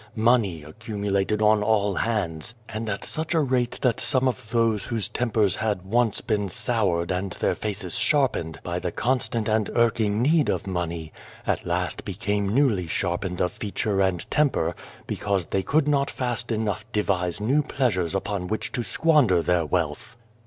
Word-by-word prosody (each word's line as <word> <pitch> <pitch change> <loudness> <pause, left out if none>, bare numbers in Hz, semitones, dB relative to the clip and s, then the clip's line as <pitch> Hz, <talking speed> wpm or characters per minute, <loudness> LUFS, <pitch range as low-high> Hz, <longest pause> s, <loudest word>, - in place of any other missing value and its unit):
Money 110 -8 +2
accumulated 105 +3 -2
on 105 0 +5
all 105 -1 +2
hands, 100 -2 -2
and 110 0 -4
at 100 - -3
such 160 +2 -1
a - - +4
rate 125 -4 0
that 125 -4 +2
some 130 0 +1
of 120 -3 -3
those 115 -3 +2
whose 115 -5 0
tempers 110 -6 +1
had 105 -4 -1
once 115 +2 +1
been 105 -3 -1
soured 90 -5 0
and 90 0 -2
their - - 0
faces 105 +2 -2
sharpened 120 - +1
by 85 0 -2
the 90 - -3
constant 120 -2 0
and 110 -1 +1
irking 115 -3 +2
need 150 +4 +3
of - - -1
money, 85 -4 -3 0.3
at - - -1
last - - -1
became 100 0 -1
newly 110 - +2
sharpened 90 +2 -2
of 90 - +1
feature 100 -1 -1
and 95 -3 0
temper, 145 - +2 0.3
because 100 -4 -1
they 95 - -1
could 150 +8 +1
not 140 -1 +2
fast 120 -1 -3
enough 110 -1 -1
devise 95 -3 0
new 130 +8 +2
pleasures 105 - 0
upon 95 -1 -2
which 110 +3 -3
to 125 -2 -1
squander 125 - +3
their 90 -3 +1
wealth. 90 +7 -2
105 Hz, 165 wpm, -25 LUFS, 95-120 Hz, 0.3 s, on